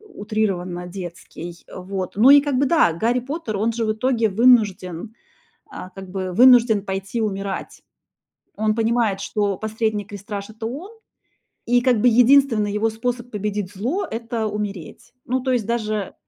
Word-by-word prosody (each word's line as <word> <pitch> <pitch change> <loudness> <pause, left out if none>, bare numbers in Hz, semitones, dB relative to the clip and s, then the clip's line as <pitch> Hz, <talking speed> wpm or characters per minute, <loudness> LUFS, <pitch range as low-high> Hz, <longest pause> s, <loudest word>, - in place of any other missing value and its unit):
утрированно 205 - -3
детский, 175 -1 -9
вот. 185 +1 -5
Ну 240 +6 +6
и, 285 0 +9
как 280 -2 -1
бы, 280 - +3
да, 175 - +3
Гарри 235 +7 0
Поттер, 260 -5 -4
он 225 +3 +1
же 230 0 -1
в 215 - +1
итоге 230 -1 0
вынужден, 210 -3 +2 0.5
а, 185 - -9
как 190 0 -10
бы, 185 -1 -4
вынужден 240 -3 +6
пойти 195 +4 -3
умирать. 195 -2 -4 0.7
Он 215 0 0
понимает, 225 -3 +1
что 200 -2 -1
последний 220 -1 -2
крестраж- 205 0 -7
это 220 +1 -7
он, 295 - -6 0.8
и, 245 +1 +3
как 245 -2 +2
бы, 250 - +5
единственный 240 -3 +4
его 220 +2 0
способ 240 +2 -4
победить 205 -2 -3
зло- 255 - -2
это 230 0 -3
умереть. 205 -5 -6
Ну, 260 +2 -1
то 260 +1 -2
есть 240 -4 0
даже, 215 -4 -2
220 Hz, 155 wpm, -21 LUFS, 195-240 Hz, 0.8 s, и